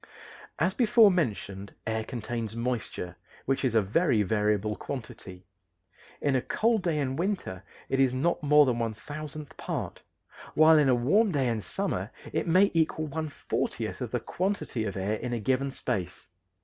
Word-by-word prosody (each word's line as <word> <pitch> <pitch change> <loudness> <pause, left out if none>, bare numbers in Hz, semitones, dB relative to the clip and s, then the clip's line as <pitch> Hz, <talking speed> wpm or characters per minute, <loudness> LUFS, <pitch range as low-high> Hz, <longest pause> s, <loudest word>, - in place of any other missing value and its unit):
As 180 +3 +1
before 230 -3 +6
mentioned, 100 - -2
air 110 0 -1
contains 115 -2 -4
moisture, 115 -7 -3 0.3
which 135 0 0
is 125 -4 +1
a 110 - +5
very 115 - +2
variable 105 +1 +1
quantity. 95 -9 -8 0.8
In 140 -2 +2
a 130 - +2
cold 225 - +1
day 170 -4 0
in 135 -2 -1
winter 175 - -2 0.3
it 135 - 0
is 135 -2 +4
not 145 +7 0
more 150 0 +6
than 120 -3 0
one 115 -2 -1
thousandth 150 +3 -8
part, - - -4 0.5
while 155 0 +7
in 145 -3 +4
a 125 - +5
warm 190 - +3
day 140 -5 +1
in 115 -2 -1
summer - - -3 0.2
it - - -1
may 185 +4 +5
equal 160 -1 +1
one 155 +1 -3
fortieth 140 - -3
of - - -3
the - - -1
quantity 185 - -2
of 100 -2 -4
air 100 +3 -1
in 125 +1 -4
a 120 - -1
given 130 +5 0
space. 95 -9 -4
130 Hz, 170 wpm, -28 LUFS, 110-155 Hz, 0.8 s, while